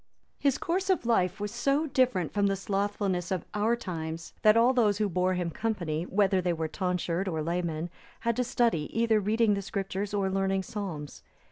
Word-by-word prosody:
His 280 -2 +2
course 375 +3 -1
of 370 -9 +2
life 195 -4 +2
was 205 0 -3
so 275 +6 +1
different 255 - +1
from 205 -1 +2
the 195 - +1
slothfulness 195 -2 -1
of 185 -4 -2
our 215 +3 +2
times, 165 -6 -5
that 215 +1 +6
all 240 +3 +5
those 215 -5 +3
who 210 -1 +1
bore 185 0 +1
him 175 -2 -2
company, 175 -7 -2
whether 195 -1 +2
they 175 -1 0
were 160 -1 -2
tonsured 180 +1 -1
or 160 -4 -1
laymen, 170 0 -2 0.3
had 235 -1 +1
to 250 - +2
study 235 - +1
either 225 -2 +3
reading 215 +1 +2
the 200 - -1
Scriptures, 195 0 -3
or 200 -2 0
learning 195 0 0
psalms. 180 -9 -6
195 Hz, 190 wpm, -29 LUFS, 180-225 Hz, 0.3 s, that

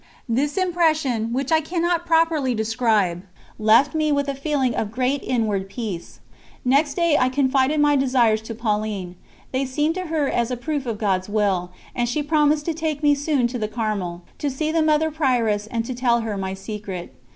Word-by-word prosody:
This 280 +6 0
impression, 315 -11 +1
which 270 +3 -2
I 320 0 +4
cannot 345 +1 -1
properly 325 -6 +2
describe, 220 -5 +1 0.4
left 225 +6 +4
me 310 -1 +1
with 285 -1 +1
a 280 - -1
feeling 275 -3 0
of 215 - -2
great 255 +3 0
inward 210 -6 -1
peace. 200 -6 -6 0.4
Next 280 +3 +2
day 340 -4 +3
I 255 - +3
confided 270 +2 +2
my 295 0 +4
desires 250 -5 +3
to 230 - -4
Pauline. 210 -5 -2 0.4
They 260 +1 0
seemed 295 +4 0
to 370 0 -4
her 310 -3 0
as 235 -2 0
a 250 - -2
proof 285 +1 -3
of 225 -2 -2
God's 190 -2 -1
Will, 200 -4 0 0.3
and 240 -1 0
she 295 +4 -1
promised 300 0 +2
to 330 - 0
take 310 -2 -3
me 290 0 +5
soon 285 -3 +1
to 245 0 -4
the 215 - -1
Carmel, 210 -6 -3 0.2
to 290 - -1
see 305 +4 -2
the 325 0 +2
Mother 310 0 +2
Prioress 240 -9 +1
and 225 0 -2
to 255 - -4
tell 240 -1 +1
her 220 -2 -3
my 190 -1 -3
secret. 195 -3 -7
255 Hz, 190 wpm, -22 LUFS, 220-300 Hz, 0.4 s, me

